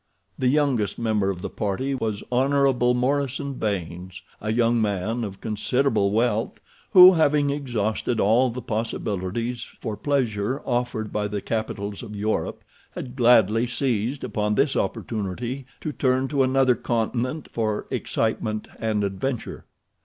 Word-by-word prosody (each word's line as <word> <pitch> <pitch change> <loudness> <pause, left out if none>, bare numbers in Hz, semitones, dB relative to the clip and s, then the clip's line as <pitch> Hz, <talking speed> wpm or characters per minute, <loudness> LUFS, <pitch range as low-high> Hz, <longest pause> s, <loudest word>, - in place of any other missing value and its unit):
The 130 - +2
youngest 130 -8 +1
member 110 -4 +1
of 90 -2 -4
the - - -3
party 110 +7 -2
was 110 -5 -2
Hon. 130 -1 +3
Morison 140 +2 0
Baynes, 95 -5 -4 0.2
a 105 - -2
young 115 0 +2
man 110 +3 -1
of 100 -3 -6
considerable 110 0 +1
wealth 110 +1 0 0.3
who, 185 -1 +10
having 145 -3 +3
exhausted 120 -4 -1
all 120 +6 +4
the 120 +1 -6
possibilities 115 0 -2 0.2
for 110 - -4
pleasure 125 -3 0
offered 120 -3 -2
by 105 -1 0
the 105 0 -3
capitals 100 -1 -3
of 110 -3 -8
Europe, 105 +2 -2 0.3
had 125 -1 -6
gladly 115 -2 +4
seized 125 +1 -1
upon 105 0 -1
this 135 +3 +2
opportunity 115 +6 -3
to 155 - -3
turn 130 -1 +1
to 140 -2 +1
another 130 -1 +4
continent 120 +5 -2
for 110 -2 -1
excitement 110 -1 -1
and 110 -2 0
adventure. 105 +6 -3
115 Hz, 135 wpm, -24 LUFS, 105-130 Hz, 0.3 s, who